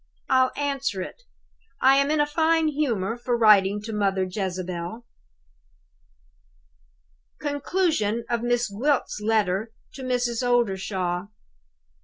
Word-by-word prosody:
I'll 260 -1 +4
answer 275 -9 -1
it. - - -10 0.6
I 270 +1 +5
am 280 +1 +2
in 305 0 +1
a 295 - +4
fine 320 +1 +2
humor 235 -8 -1
for 240 0 -1
writing 210 -3 +5
to 225 0 -6
Mother 195 -2 +1
Jezebel." 185 +2 -4 2.3
Conclusion 285 - 0
of 235 -1 -1
Miss 245 0 +1
Gwilt's 250 +2 -1
Letter 215 -1 +1 0.2
to 270 - -9
Mrs. 245 -2 -1
Oldershaw. 190 -7 0
235 Hz, 110 wpm, -25 LUFS, 195-275 Hz, 2.3 s, I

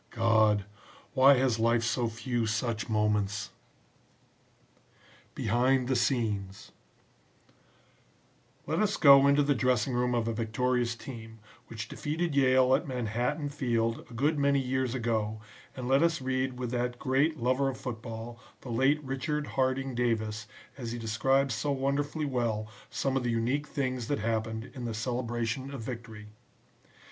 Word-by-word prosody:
God! 110 -3 +3 0.5
why 135 0 +7
has 125 -3 +1
life 115 +1 +3
so 120 +1 0
few 115 0 -2
such 110 +1 -2
moments!" 105 -2 0 1.8
BEHIND 125 +3 +2
THE 130 - +1
SCENES 110 -6 -1 1.9
Let 160 +3 -1
us 210 -1 +1
go 140 -2 +8
into 140 +1 +4
the 145 0 +2
dressing 125 +1 +1
room 125 0 +1
of 115 -1 0
a 115 - 0
victorious 120 +1 0
team, 115 -2 -9 0.3
which 115 0 -6
defeated 160 +5 -2
Yale 130 -1 +4
at - - +1
Manhattan 125 +4 -2
Field 115 -5 0
a - - -12
good 145 +5 +1
many 140 0 +3
years 130 -1 -1
ago 110 -3 -1 0.4
and 125 -2 -5
let 135 +2 +4
us 170 -1 +2
read 130 -1 -1
with 125 -2 -4
that 125 0 -1
great 140 +5 +1
lover 130 +2 +1
of 130 - -5
football, 115 -1 -7 0.2
the 125 - -9
late 135 +6 +2
Richard 145 +3 -2
Harding 135 0 -1
Davis, 110 -3 -1 0.3
as 120 -3 -4
he - - -4
describes 125 +4 +1
so 145 +7 -1
wonderfully 140 +3 -1
well 115 -5 -1 0.2
some 135 -1 -1
of 135 - +1
the 120 - -1
unique 120 +6 0
things 130 -4 -2
that 145 - 0
happened 110 +2 -2
in 125 -3 -6
the 115 -2 -3
celebration 120 +2 -2
of 135 -4 -6
victory. 110 -3 -8
125 Hz, 145 wpm, -29 LUFS, 115-135 Hz, 1.9 s, go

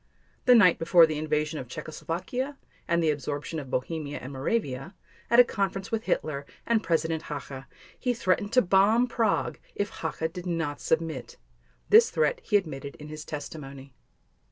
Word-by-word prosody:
The 250 -1 +7
night 185 -7 +6
before 165 0 +6
the 155 -1 -3
invasion 155 0 -1
of 125 - -7
Czechoslovakia 175 - -4 0.3
and 170 0 +2
the 155 - +4
absorption 145 +2 -4
of 135 -3 -8
Bohemia 145 +3 -3
and 130 +2 -8
Moravia, 135 - -2 0.3
at 235 - +5
a - - +11
conference 195 -4 -2
with 225 -1 -2
Hitler 145 -2 -1 0.2
and 230 -2 +2
President 160 -2 0
Hacha 135 -2 -6 0.3
he 250 - 0
threatened 205 -2 0
to 255 - +5
bomb 200 +6 +4
Prague 230 -4 0 0.2
if 205 +1 -2
Hacha 160 -3 -3
did 180 +2 -7
not 165 -4 -2
submit. 160 -5 -2 0.5
This 450 +2 +7
threat 485 +1 +1
he 210 - +3
admitted 140 -7 -5
in 150 0 -11
his 155 0 -7
testimony. 140 -3 -8
165 Hz, 160 wpm, -27 LUFS, 145-205 Hz, 0.5 s, a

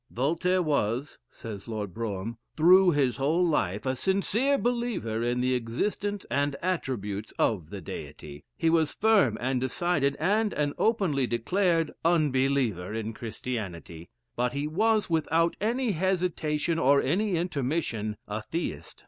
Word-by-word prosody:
"Voltaire 170 +8 +1
was," 140 -2 -1
says 110 -5 -9
Lord 105 -5 -4
Brougham, 110 +1 -4 0.2
"through 180 +4 +7
his 140 -6 +1
whole 155 +6 +2
life, 105 - 0
a 130 0 0
sincere 200 - +1
believer 235 - -1
in 120 +1 0
the 130 0 +1
existence 195 - -2
and 140 0 +1
attributes 110 - -3
of 90 -9 0
the 100 0 -7
Deity. 75 -2 -8
He 165 - 0
was 160 -2 +2
a - - -25
firm 200 - +3
and 130 0 0
decided, 140 +1 0
and 205 +8 +1
an 145 -1 0
openly 175 - +2
declared 165 - +1
unbeliever 135 - +1
in 110 0 -3
Christianity; 100 -8 -6 0.3
but 125 0 0
he 140 +1 -2
was, 215 +6 +2
without 165 +1 +1
any 235 +2 +1
hesitation 170 -3 0
or 140 0 +5
any 190 +8 +1
intermission, 140 - -2
a 105 +1 -3
Theist." 105 - -5
145 Hz, 140 wpm, -28 LUFS, 115-180 Hz, 0.3 s, through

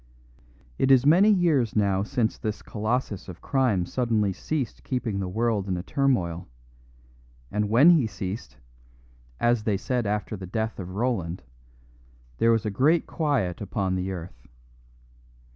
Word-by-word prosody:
It 135 - +2
is 130 -1 +6
many 180 +8 +6
years 165 - +2
now 100 -2 +2
since 115 +1 -1
this 110 -2 -4
colossus 110 -2 -3
of 90 - -9
crime 125 -10 +1
suddenly 110 -3 0
ceased 140 +2 -4
keeping 120 -6 -2
the 95 - -2
world 110 -1 0
in 90 -2 -1
a 90 - -5
turmoil; 95 -11 0 1.0
and 105 0 -1
when 135 +10 +7
he 150 -9 +4
ceased, 95 - -6 0.8
as 120 -2 +2
they 105 -3 +1
said 120 +2 -2
after 105 +1 -2
the 95 -2 -8
death 110 +3 -3
of 95 0 -7
Roland, 100 -7 -2 1.0
there 115 - +4
was 115 -1 +1
a 105 - -1
great 145 +11 +3
quiet 135 - -1
upon 95 -1 -2
the 95 0 -2
earth. 75 -9 -9
110 Hz, 145 wpm, -26 LUFS, 95-125 Hz, 1.0 s, when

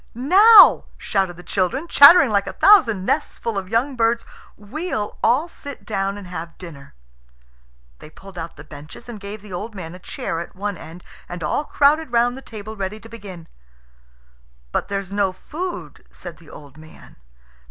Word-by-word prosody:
"Now!" 390 - +7
shouted 190 -4 -2
the 175 - -12
children, 205 - -2
chattering 280 -4 +7
like 200 -1 +1
a - - -5
thousand 235 - +4
nests - - -1
full 230 -2 -4
of 190 -2 -4
young 245 +5 0
birds, 230 0 0 0.3
"we'll 215 - -5
all 255 +9 +2
sit 285 -5 -11
down 195 -1 -2
and 200 - -10
have 170 -2 -8
dinner." 150 -6 -12 1.0
They - - -13
pulled 195 +4 -15
out 165 -1 -7
the 150 - -12
benches 150 +8 -12
and 235 -3 -8
gave 200 +1 -9
the 205 -3 -11
old 210 +5 -6
man 170 -3 -8
a 180 - -11
chair 165 - -5
at 170 - -8
one 205 +1 -4
end, 165 +2 -12 0.3
and 175 -1 -7
all 220 - -1
crowded 295 0 +2
round 240 +1 +2
the 265 - -10
table 220 -3 -9
ready 200 +1 -5
to 225 - -14
begin. 195 -7 -11 1.2
"But - - -2
there's 195 -1 -4
no 200 -2 +1
food," 350 - -7
said 175 -4 -10
the 160 +1 -18
old 145 0 -14
man. 155 0 -16
205 Hz, 175 wpm, -21 LUFS, 180-245 Hz, 1.2 s, Now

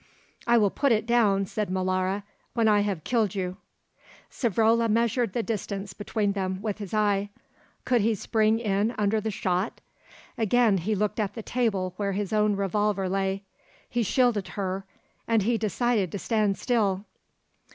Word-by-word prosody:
"I 235 0 +5
will 205 -3 +3
put 280 -2 +1
it 220 -1 +2
down," 215 -5 +3
said 210 +1 -3
Molara, 185 +1 0 0.3
"when 230 -2 +3
I 210 -1 +5
have 200 -6 -1
killed 220 -5 +1
you." 185 -1 -3 0.7
Savrola 230 0 +2
measured 230 -1 +1
the 235 - 0
distance 200 -3 -4
between 205 0 -1
them 190 -1 -2
with 210 0 -3
his 200 -3 -6
eye. 205 -2 +1 0.6
Could 245 -3 +3
he 220 +2 +2
spring 220 +2 +2
in 215 +1 0
under 215 +1 +1
the 220 - -2
shot? 185 0 -1 0.6
Again 225 -2 +3
he 210 +6 -1
looked 210 +2 -1
at 205 -2 -1
the 225 - -6
table 200 -8 -1
where 200 -1 -1
his 205 +1 -2
own 210 -1 +3
revolver 200 0 0
lay. 195 +1 -1 0.4
He 240 - -1
shielded 230 -2 +2
her, 190 0 -2 0.4
and 225 -3 +3
he 230 +2 +1
decided 215 -2 0
to - - -2
stand 210 0 0
still. 205 -5 0
210 Hz, 160 wpm, -26 LUFS, 195-225 Hz, 0.7 s, I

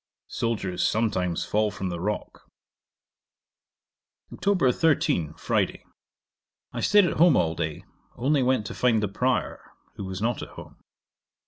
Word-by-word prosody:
Soldiers 100 -6 -2
sometimes 95 -6 0
fall 105 0 +1
from 95 -2 -4
the 85 -1 -4
rock. 105 +4 -4 1.8
'Oct. 185 -10 +2
13. 145 - +1
Friday. - - -1 0.9
I - - -4
staid 205 -2 +5
at 170 - -2
home 170 -3 +6
all 80 -1 +2
day, 80 -2 -4 0.3
only 140 +4 +1
went 125 -4 +1
to - - -5
find 115 -4 +2
the - - +1
Prior, 125 +6 -1 0.4
who 100 - -5
was 95 -1 -5
not 115 +3 -1
at - - -7
home. - - -11
110 Hz, 135 wpm, -26 LUFS, 95-130 Hz, 1.8 s, home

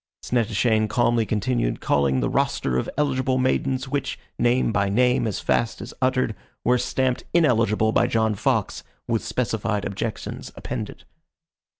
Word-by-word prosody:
Snettishane 110 -2 +1
calmly 120 -1 +2
continued 110 - 0
calling 70 -2 +1
the - - 0
roster 65 - 0
of - - -3
eligible 130 -3 +1
maidens, 130 +1 0
which, 140 +1 -2 0.2
name 120 0 +2
by 100 -1 +1
name, 125 +3 +2
as 105 - -2
fast 115 -2 0
as - - -8
uttered, 130 -3 +1 0.3
were 125 +1 +3
stamped 130 +1 0
ineligible 115 -8 +3
by - - +3
John 110 -1 +1
Fox, 100 - -1 0.2
with 115 -2 0
specified 110 -4 -1
objections 105 +3 -5
appended. - - -6
115 Hz, 135 wpm, -24 LUFS, 105-130 Hz, 0.3 s, were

